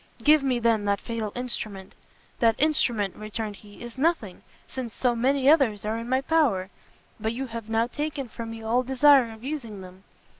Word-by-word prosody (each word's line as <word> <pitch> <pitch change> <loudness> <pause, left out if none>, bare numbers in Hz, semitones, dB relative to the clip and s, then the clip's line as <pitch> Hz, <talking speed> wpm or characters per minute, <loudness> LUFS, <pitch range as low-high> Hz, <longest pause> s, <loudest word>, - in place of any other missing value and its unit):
"Give 305 0 +6
me, 265 -2 +1
then, 230 -3 +1
that 200 -1 +1
fatal 225 -2 -4
instrument!" 215 -6 -3 0.5
"That 225 -2 +4
instrument," 240 -10 +2
returned 215 -1 -5
he, 205 +3 -14
"is 240 +2 -9
nothing, 275 - 0 0.3
since 245 -4 -6
so 245 -2 +1
many 265 +3 +1
others 265 -10 +4
are 220 +2 -1
in 230 +1 -7
my 260 +1 +2
power; 260 -12 +1 0.5
but 220 +1 -2
you 265 +3 -4
have 230 -3 -7
now 225 +1 +2
taken 290 +1 -4
from 230 0 -7
me 225 0 -8
all 235 +3 +2
desire 265 -1 +5
of 220 +1 -13
using 245 -8 -5
them. 185 +1 -13
235 Hz, 185 wpm, -26 LUFS, 215-265 Hz, 0.5 s, Give